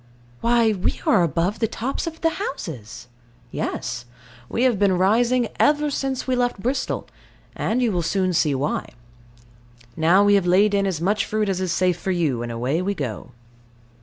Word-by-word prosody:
Why, 235 -1 +3
we 190 -3 -2
are - - +4
above 170 +5 0
the 225 - +1
tops 255 +9 -3
of 325 0 -6
the 330 - +2
houses. 130 - -6 0.4
Yes. 120 0 -4 0.4
We 235 - 0
have 245 -6 +2
been 195 -3 +3
rising 235 +5 +2
ever 295 0 +3
since 270 -2 -2
we 260 - 0
left 245 -3 0
Bristol; 255 +7 -2 0.5
and 250 +3 0
you 235 - +2
will 175 -3 0
soon 185 +2 0
see 155 -4 +2
why. 140 +3 -2 1.1
Now 170 +5 +4
we 205 0 +4
have 195 -3 +3
laid 200 +4 +4
in 200 -1 +2
as 175 -4 -2
much 205 +5 +1
fruit 215 -1 -1
as 190 -1 -1
is 185 -2 -1
safe 180 0 +1
for - - -4
you, 160 -10 0
and 120 0 -4
away 125 +8 -1
we 200 +2 -1
go. 110 - -5
195 Hz, 180 wpm, -22 LUFS, 170-235 Hz, 1.1 s, are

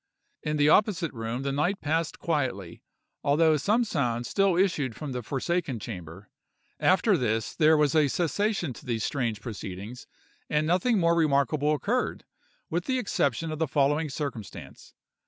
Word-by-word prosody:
In 150 0 -2
the 145 0 +4
opposite 180 -3 +3
room 115 +2 -4
the 140 - -1
night 165 +8 0
passed 160 +2 -1
quietly, 130 - -2 0.4
although 155 +2 +4
some 210 - +2
sounds 120 - -1
still 195 -3 +2
issued 155 - +1
from 150 -3 -6
the 125 -1 -3
forsaken 140 +2 -2
chamber. 95 -3 -9 0.5
After 190 +2 +4
this 115 - -1
there 155 -1 +4
was 150 -2 +2
a 155 -2 +4
cessation 175 - -1
to - - -14
these 115 -3 -1
strange 115 -6 -2
proceedings, 105 +1 -7 0.4
and 150 0 +1
nothing 185 +8 +2
more 170 -1 +3
remarkable 150 -1 +2
occurred, 240 - -2 0.4
with - - -2
the 260 -1 0
exception 165 - 0
of 155 - -5
the 160 - +1
following 145 +3 +1
circumstance. 135 -7 -7
150 Hz, 155 wpm, -27 LUFS, 125-170 Hz, 0.5 s, the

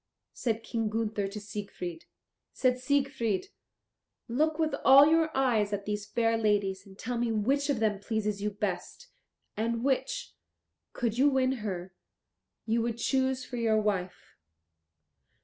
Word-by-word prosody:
said 225 -2 -2
King 225 -2 -2
Gunther 215 -2 -1
to 205 +2 -6
Siegfried. 200 -5 -6 0.5
Said 255 -1 +1
Siegfried, 270 - 0 0.8
"Look 305 +6 +1
with 315 -1 0
all 270 +2 +9
your 320 +1 +3
eyes 225 -6 +2
at 200 0 -3
these 210 0 -3
fair 225 +1 +1
ladies, 200 -2 0
and 190 0 -15
tell 240 +2 -3
me 235 -1 0
which 270 +7 +1
of 275 -5 +1
them 210 -3 +1
pleases 210 -1 -2
you 210 - 0
best, 210 - -4 0.5
and 230 +2 -1
which, 390 - -1 0.6
could 235 -1 -2
you 285 +2 +6
win 265 -1 +2
her, 185 -3 -4 0.7
you 230 +1 +1
would 230 0 -2
choose 260 +1 0
for 245 - -6
your 225 -2 +2
wife." 185 - -3
225 Hz, 145 wpm, -29 LUFS, 205-260 Hz, 0.8 s, all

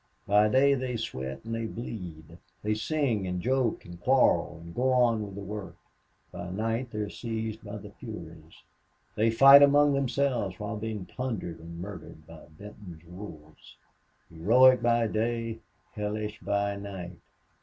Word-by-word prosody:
By 105 +1 +4
day 135 +4 +5
they 130 -2 -2
sweat 70 - -5
and 115 - -4
they 115 0 -2
bleed, 90 -10 -8 0.2
they 105 +1 +1
sing 115 -4 -1
and 90 0 -2
joke 130 +2 0
and 85 0 -11
quarrel 90 -9 +3
and 85 0 -11
go 130 +5 +1
on 120 -4 +3
with 100 -2 -8
the 100 - -6
work. 105 0 -7 0.6
By 90 - -7
night 115 +6 -2
they 110 - -8
are 105 - -3
seized 110 -1 -5
by 105 0 -7
the 105 0 -10
furies. 85 -8 -11 0.5
They 110 +2 +3
fight 135 +5 +9
among 145 0 +6
themselves 130 -7 0
while 105 +1 -4
being 105 -2 -4
plundered 110 -11 -5
and 85 +1 -9
murdered 90 -4 -9
by 80 0 -13
Benton's 100 -5 -11
wolves. 80 -7 -12 0.6
Heroic 120 +10 +5
by 120 0 +3
day 115 +1 -2 0.3
hellish 105 +1 -4
by 100 0 -1
night.... 95 -3 -8
105 Hz, 155 wpm, -28 LUFS, 90-120 Hz, 0.6 s, fight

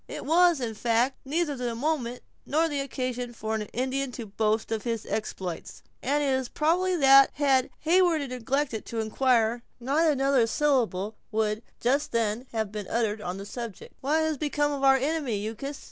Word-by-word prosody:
It - - -7
was, 345 0 +4
in 235 -3 -3
fact, 235 +4 +1
neither 300 +1 0
the 245 -2 -3
moment 250 -2 -2 0.2
nor 320 +3 +1
the 290 -3 -2
occasion 255 -3 -3
for 220 -1 -4
an 220 - -1
Indian 265 +2 -2
to 235 - -6
boast 215 +2 -1
of 220 -1 -1
his 230 -2 -3
exploits; 185 -5 -5 0.2
and 290 +3 +1
it 275 -2 +2
is 260 -2 -1
probably 360 +4 +1
that, 275 -3 +7
had 270 -3 +2 0.2
Heyward 335 -3 +3
neglected 255 -1 -2
to 230 - -4
inquire, 230 +1 +2 0.2
not 290 +7 +2
another 270 -4 +2
syllable 225 -7 0
would, 215 0 0 0.2
just 270 +4 0
then, 230 +2 0
have 220 -3 -2
been 210 -3 -5
uttered 220 -2 -1
on 180 -1 -4
the 200 - -7
subject. 230 -2 -7
"What 300 +4 +2
has 315 -3 -1
become 290 -1 0
of 280 -1 -3
our 270 0 +6
enemy, 265 -7 -1
Uncas?" 275 +6 -6
255 Hz, 175 wpm, -27 LUFS, 225-290 Hz, 0.2 s, that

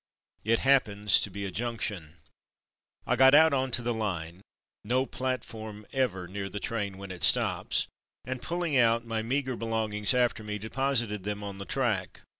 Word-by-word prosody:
It 115 +2 +3
happens 105 -7 +4
to - - -1
be 100 +1 -5
a 95 - -4
junction. 105 -7 -4 0.9
I - - +1
got 135 +1 +7
out 160 0 +6
on 130 -1 +1
to 120 -1 0
the 120 0 0
line 90 -5 -4 0.4
(no 125 +5 +1
platform 110 -5 -5
ever 110 -10 -1
near 100 +2 -5
the 105 - -5
train 100 -3 -3
when 100 -1 -8
it 90 -2 -9
stops), - - +3 0.4
and 130 -1 -4
pulling 170 -3 -2
out 115 -2 +3
my 115 -1 -2
meagre 130 +2 -1
belongings 110 -1 0
after 120 -3 +1
me 105 0 -4
deposited 115 -2 -1
them 105 +1 -4
on 100 -1 -6
the 100 - -6
track. 115 -8 -1
110 Hz, 170 wpm, -28 LUFS, 100-130 Hz, 0.9 s, got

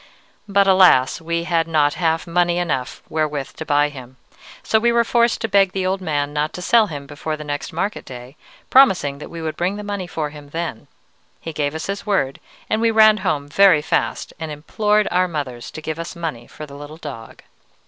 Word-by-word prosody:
But 200 0 +3
alas! 185 -10 +5
we 170 +1 -2
had 165 -1 0
not 150 -3 +2
half 165 -2 0
money 175 0 +1
enough 140 -8 -2
wherewith 150 -3 -2
to 160 - -6
buy 145 0 +3
him, 130 -3 -12 0.5
so 220 - +2
we 235 +2 +3
were 235 0 +3
forced 235 0 +2
to 225 - 0
beg 195 -2 +3
the 190 -1 -1
old 190 +1 -1
man 145 -4 -2
not 150 +1 -1
to 180 - -7
sell 225 +1 +4
him 145 -5 -7
before 150 +2 -5
the 150 - -7
next 145 -1 -4
market 195 +6 -3
day, 125 +2 -10 0.4
promising 185 - +4
that - - -9
we 165 -1 -7
would 155 -1 -3
bring 180 +3 -1
the 210 - -6
money 200 -3 -4
for 155 -4 -3
him 145 -1 -12
then. 165 -6 -5 0.5
He 165 - -7
gave 145 0 -2
us 160 - -4
his 200 +1 -4
word, 190 -10 0 0.3
and 215 - 0
we 230 - +3
ran 215 -1 +6
home 155 -8 -1
very 170 0 +5
fast - - -1
and 160 -1 -5
implored 210 +8 0
our 185 +1 +2
mothers 140 -8 -5
to 155 - -9
give 160 +1 -4
us 165 +2 -6
money 155 -9 -5
for 155 - -9
the 140 - -13
little 145 +2 -10
dog. 135 -9 -9
160 Hz, 210 wpm, -20 LUFS, 145-190 Hz, 0.5 s, ran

